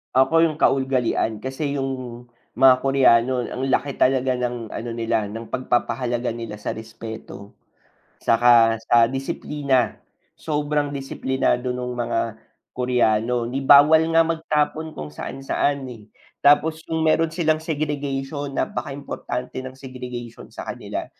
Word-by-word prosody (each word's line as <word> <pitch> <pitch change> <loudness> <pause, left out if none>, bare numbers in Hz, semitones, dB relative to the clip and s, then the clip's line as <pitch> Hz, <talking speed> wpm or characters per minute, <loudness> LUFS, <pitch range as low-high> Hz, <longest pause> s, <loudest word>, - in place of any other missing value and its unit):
Ako 135 +5 +4
'yong 160 -2 +1
kaugalian, 125 -5 +1
kasi 140 +2 -3
'yong 130 -3 -4 0.3
mga 130 0 +7
Koreano 130 -2 +3
ang 130 - -5
laki 140 +1 -1
talaga 130 0 +3
ng 120 -3 -3
ano 120 - -5
nila 115 -2 -1
ng 115 +2 -8
pagpapahalaga 120 0 -1
nila 115 -2 -6
sa 105 - -4
respeto, 110 -2 -9 0.7
tsaka 115 -1 +5
sa 115 0 +5
disiplina, 135 -1 -1 0.3
sobrang 150 -1 -1
disiplinado 130 -2 -1
no'ng 125 0 -3
mga 120 -1 -1 0.5
Koreano, 120 -1 +1
ni 130 +3 -3
bawal 145 +4 +7
nga 165 0 +4
magtapon 160 -1 -1
kung 75 - -4
saan-saan, 135 - -2
eh, 110 -1 -16 0.3
tapos 155 +2 +4
kung 160 0 -2
meron 160 +1 +3
silang 160 -2 0
segregation 145 -2 -3
napakaimportante 135 -2 -4
ng 130 0 -9
segregation 125 -3 -8
sa - - -8
kanila, - - -5
130 Hz, 120 wpm, -22 LUFS, 120-145 Hz, 0.7 s, mga